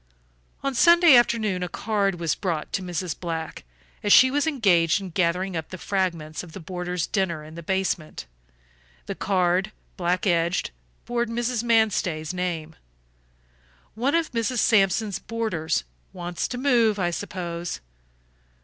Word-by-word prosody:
On 275 0 -1
Sunday 340 +2 +7
afternoon 220 -6 +2
a 180 - -2
card 200 -4 -1
was 165 -3 0
brought 170 -6 -3
to - - 0
Mrs. 180 -2 -3
Black, 165 -2 -5 0.4
as 205 - 0
she 260 +4 +8
was 290 +3 +1
engaged 195 - +3
in 190 -2 -7
gathering 180 +2 0
up 160 -1 -4
the 185 - -7
fragments 170 -5 -2
of 170 -3 -12
the - - -7
boarders' 180 -1 -3
dinner 175 -6 -1
in 155 +1 -12
the 170 - -8
basement. 190 - -2 0.8
The - - -4
card, 185 +1 +1 0.3
black 180 +1 0
edged, 170 -1 +1 0.3
bore 240 0 0
Mrs. 235 0 -1
Manstey's 205 -9 +1
name. 170 -3 -3 1.2
"One 255 +8 0
of 335 -1 0
Mrs. 235 +1 -1
Sampson's 200 -2 +2
boarders; 215 - -2 0.3
wants 175 -1 -3
to 250 - -5
move, 240 -5 +3
I 175 -3 0
suppose. 175 -2 -5
185 Hz, 140 wpm, -25 LUFS, 170-225 Hz, 1.2 s, she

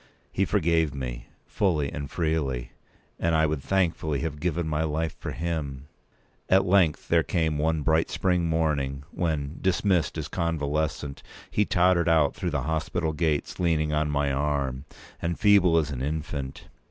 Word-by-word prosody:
He - - +1
forgave 80 -3 +1
me, - - -5 0.2
fully 80 -8 0
and 70 -2 -5
freely; 75 -8 -1 0.5
and 85 -1 +1
I 80 0 +4
would 75 -2 -1
thankfully 80 -5 0
have 80 -3 -3
given 85 0 -1
my 75 0 0
life 80 0 -2
for - - -5
him. 75 -5 -4 0.6
At 95 +1 +5
length 90 -5 +3
there 85 -1 +5
came 80 -3 0
one 80 0 +1
bright 80 +1 +2
spring 90 -3 +1
morning, 70 -4 0
when, 80 -4 -2
dismissed 90 -4 +1
as 75 -2 -3
convalescent, 75 -4 -2 0.3
he 105 - +2
tottered 90 -2 +3
out 80 -3 +4
through 90 - -3
the 75 -5 -1
hospital 80 +1 -1
gates, 75 -2 -1
leaning 80 -3 +1
on 75 0 +1
my 70 -1 +1
arm, 70 -1 -1 0.4
and 85 0 -2
feeble 100 -5 +5
as 75 -2 +1
an 65 -2 -4
infant. 75 -2 -4
80 Hz, 155 wpm, -26 LUFS, 70-85 Hz, 0.6 s, At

